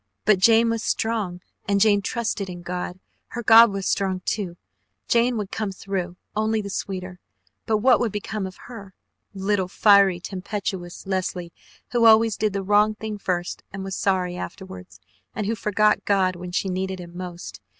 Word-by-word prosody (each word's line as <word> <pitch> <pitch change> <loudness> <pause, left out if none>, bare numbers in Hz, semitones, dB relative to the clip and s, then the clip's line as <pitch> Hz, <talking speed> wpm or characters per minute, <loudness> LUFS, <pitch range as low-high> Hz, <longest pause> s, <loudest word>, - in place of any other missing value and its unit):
But 210 -2 +4
Jane 230 +3 +5
was 230 -1 -2
strong 215 -7 -2 0.3
and 200 0 +2
Jane 205 -1 +4
trusted 210 -2 -2
in 175 -1 -8
God. 180 +1 -5 0.3
Her 240 - -6
God 230 +1 +8
was 195 -1 -4
strong, 190 -2 0
too! 185 -5 -2 0.5
Jane 240 0 +2
would 210 -2 -4
come 215 -3 -2
through 190 -2 -4 0.2
only 220 +1 +1
the 200 -1 -5
sweeter. 185 -2 -5 0.5
But 220 - +2
what 255 -2 +6
would 235 -3 0
become 205 -1 -4
of 185 - -11
her 200 -6 -11 0.4
little, 195 -1 0
fiery, 200 -2 +5
tempestuous 190 -1 -5
Leslie, 185 -2 -3 0.4
who 240 -1 +3
always 225 0 +6
did 215 -2 -1
the 200 -1 -2
wrong 210 +2 +3
thing 215 -1 -6
first 175 -2 -2
and 195 0 -6
was 195 -1 -4
sorry 185 -2 0
afterwards, 95 - -9 0.4
and 210 - -2
who 220 - 0
forgot 210 0 +1
God 190 -2 +2
when 175 0 -7
she 185 - -1
needed 190 0 -3
Him 175 -1 -10
most? 175 - -8
195 Hz, 170 wpm, -24 LUFS, 185-215 Hz, 0.5 s, God